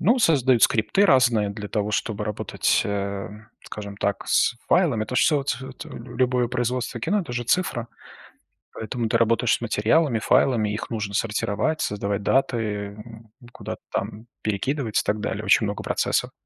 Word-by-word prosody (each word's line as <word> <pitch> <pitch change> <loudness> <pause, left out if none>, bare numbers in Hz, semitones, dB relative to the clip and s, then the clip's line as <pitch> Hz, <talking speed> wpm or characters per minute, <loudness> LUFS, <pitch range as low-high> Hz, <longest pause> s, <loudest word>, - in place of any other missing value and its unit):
Ну, 235 +9 +3
создают 130 - +3
скрипты 110 - +3
разные 120 - +4
для 105 0 -7
того, 105 0 -1
чтобы 105 -1 -2
работать, 105 -1 0
э, 100 -1 -3 0.4
скажем 100 -1 -8
так, 100 -1 -2
с - - +3
файлами. 145 -12 +3
Это 125 - -4
ж - - +5
всё 150 -3 +3
ц 135 -3 -2 0.2
ц - - -8
любое 125 0 -1
производство 125 -1 -2
кино- 205 - +1
это 165 -10 -7
же 120 0 -2
цифра. 120 -4 0 0.9
Поэтому 115 0 -3
ты 115 - +2
работаешь 115 +1 +2
с - - -3
материалами, 120 +4 +2
файлами. 110 0 +2
Их 105 - -5
нужно 105 -3 -3
сортировать, 110 +8 -1
создавать 100 0 -2
даты, 130 +2 +2
э, 105 -2 -3
м, 110 0 -12 0.2
куда-то - - -7
там 110 +2 -4 0.2
перекидывать 110 +3 -1
и - - +2
так 105 +1 -1
далее. 105 0 -3
Очень 105 +2 +4
много 100 0 -4
процессов. - - 0
115 Hz, 170 wpm, -24 LUFS, 105-125 Hz, 0.9 s, ж